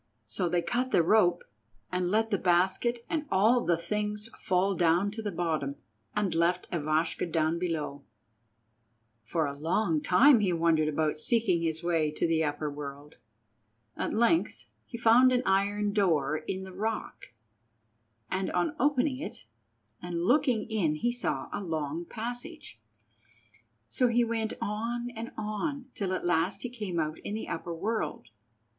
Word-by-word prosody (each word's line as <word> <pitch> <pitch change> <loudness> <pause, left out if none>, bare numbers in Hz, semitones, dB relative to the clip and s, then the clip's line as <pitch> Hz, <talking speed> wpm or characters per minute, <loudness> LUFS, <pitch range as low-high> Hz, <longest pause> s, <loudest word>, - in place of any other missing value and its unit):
So 140 - -2
they 175 0 +1
cut 250 +2 -1
the 170 - +4
rope 175 -2 +3 0.5
and 180 -1 0
let 220 +3 +1
the 200 - +1
basket 190 +7 +1
and 310 -2 -2
all 220 +6 +4
the 170 -1 +2
things 210 +4 -3
fall 190 +2 +1
down 175 +3 +2
to 225 +2 -6
the 210 -2 -3
bottom, 160 -5 -1 0.4
and 205 -3 0
left 170 +2 +1
Ivashka 160 +1 0
down 160 +1 +1
below. 155 -5 -3 1.2
For 155 +8 0
a 140 -1 -4
long 160 +2 0
time 240 - +6
he 200 -3 +1
wandered 165 -2 +2
about 155 0 0
seeking 200 -3 +1
his 160 -1 -2
way 165 -3 +1
to - - 0
the 165 -1 +2
upper 150 0 -2
world. 145 0 -7 0.8
At - - -2
length 235 +9 +1 0.2
he 235 - -7
found 235 +2 +6
an 250 0 +2
iron 205 +1 +1
door 160 -8 +2
in 190 +4 -4
the 190 -1 -9
rock, 220 +3 -4 1.0
and 190 0 -1
on 180 - 0
opening 265 0 +2
it 280 - -7 0.6
and 175 -1 -3
looking 250 -2 +3
in 195 -9 0
he 240 +10 0
saw 240 - -2
a - - -2
long 160 -2 -3
passage. 245 - -7 1.1
So 250 - +1
he 240 0 +3
went 225 -1 -1
on 230 +3 -2
and 230 0 -7
on 255 +6 -3
till 195 -3 -3
at 185 - -3
last 175 +3 +1
he 250 - -4
came 210 -8 -3
out 155 0 -2
in 205 - -5
the 220 - -5
upper 170 0 -4
world. 200 - -3
190 Hz, 155 wpm, -29 LUFS, 165-225 Hz, 1.2 s, time